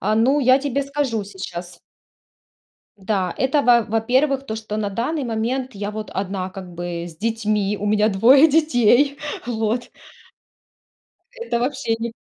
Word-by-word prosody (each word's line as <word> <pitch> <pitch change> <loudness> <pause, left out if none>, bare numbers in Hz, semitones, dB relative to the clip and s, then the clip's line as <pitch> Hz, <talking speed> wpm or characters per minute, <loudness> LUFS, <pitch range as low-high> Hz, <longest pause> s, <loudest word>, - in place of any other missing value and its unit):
А, 215 +2 +1
ну, 255 +6 +3
я 260 0 +5
тебе 280 0 -1
скажу 275 -7 -2
сейчас. 180 -3 -8 1.2
Да, 190 -2 -1
это, 265 +3 +2
во 240 -3 +5
во-первых, 260 +6 +1
то, 220 - -4
что 215 -1 -5
на 205 -2 -1
данный 255 +8 -2
момент 245 +3 -2
я 205 +1 -4
вот 215 0 -6
1 190 -1 -3
как 185 -2 -10
бы 175 0 -5
с 160 -2 -13
детьми, 210 -2 -1
у 205 - -5
меня 210 0 +3
2 245 +9 +6
детей. 280 -3 +3 0.3
Вот. 225 0 -2 1.4
Это 465 - -3
вообще 255 -3 -1
не 235 0 -3
225 Hz, 145 wpm, -21 LUFS, 205-265 Hz, 1.4 s, 2